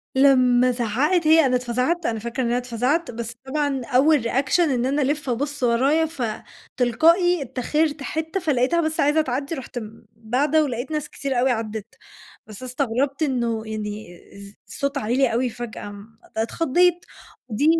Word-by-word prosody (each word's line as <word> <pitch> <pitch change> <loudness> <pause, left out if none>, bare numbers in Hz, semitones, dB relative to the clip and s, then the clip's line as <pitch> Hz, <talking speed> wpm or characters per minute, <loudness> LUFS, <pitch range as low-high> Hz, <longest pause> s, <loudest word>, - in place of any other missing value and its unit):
لمّا 255 -2 +5
زعّقِت 260 - +1
هي، 320 -1 +6
أنا 255 - +2
اتفزَعت، 250 +8 -1
أنا 225 -1 -1
فاكرة 235 +4 -3
إن - - 0
أنا 240 +1 +1
اتفزَعت. 250 +7 -1
بس 235 0 -5
طبعًا 285 -1 -1
أول 280 +1 +3
reaction 265 +7 +1
إن 265 -8 +2
أنا 280 +3 +1
ألِف 290 0 -1
أبُص 285 +3 -2
ورايا، 270 +7 +3
فتلقائي 315 - 0
إتّاخِرت 285 +4 -1
حتّة، 320 +5 -3
فلقيتها 300 +1 +1
بس 315 0 -2
عايزة 295 +2 +3
تعدّي 275 +3 -3
رُحت 255 -3 -6 0.4
باعدة 275 +8 +1
ولقيت 250 0 -4
ناس 305 -2 -3
كتير 270 -3 -2
أوي 255 +1 +3
عدّت. 220 -1 -4 0.5
بس 215 +2 -10
استغربت 270 +3 -1
إنه 235 -5 -1
يعني 210 -4 -6 0.2
إز 200 0 -12
صوتها 280 -1 -3
عِلي 245 +1 +1
فجأة، 235 -3 -7
امم، 205 +2 -13 0.2
اتخضيت. 345 +9 +1 0.4
ودي 225 +7 0
260 Hz, 150 wpm, -23 LUFS, 235-300 Hz, 0.5 s, هي